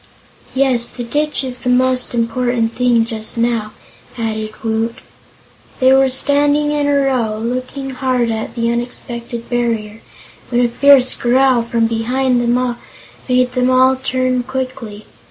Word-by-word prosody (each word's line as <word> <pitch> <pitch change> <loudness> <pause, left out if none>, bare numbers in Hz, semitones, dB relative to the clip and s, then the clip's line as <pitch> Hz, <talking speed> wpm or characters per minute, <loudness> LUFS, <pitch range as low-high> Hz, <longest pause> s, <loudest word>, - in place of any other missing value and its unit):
"Yes, 260 -3 +2
the 245 - -7
ditch 290 +3 -1
is 255 -1 -3
the 250 - -3
most 255 0 +1
important 235 0 0
thing, 240 -2 +2
just 220 -1 -5
now," 230 -2 0 0.5
added 220 -2 -3
Woot. 225 +1 -1 0.8
They 260 0 +5
were 270 0 +4
standing 290 +2 +2
in 295 -1 0
a 285 - +2
row, 235 -5 0
looking 255 +4 -4
hard 255 -3 0
at 220 0 -4
the 230 -1 0
unexpected 235 -1 -5
barrier, 225 -3 -2 0.5
when 245 0 +2
a - - 0
fierce 265 +1 +5
growl 255 0 +2
from 230 0 0
behind 245 +3 0
them 240 +1 0 0.5
made 250 0 +2
them 250 0 +1
all 260 +1 +4
turn 255 -1 -1
quickly. 255 -5 -6
245 Hz, 140 wpm, -17 LUFS, 230-260 Hz, 0.8 s, They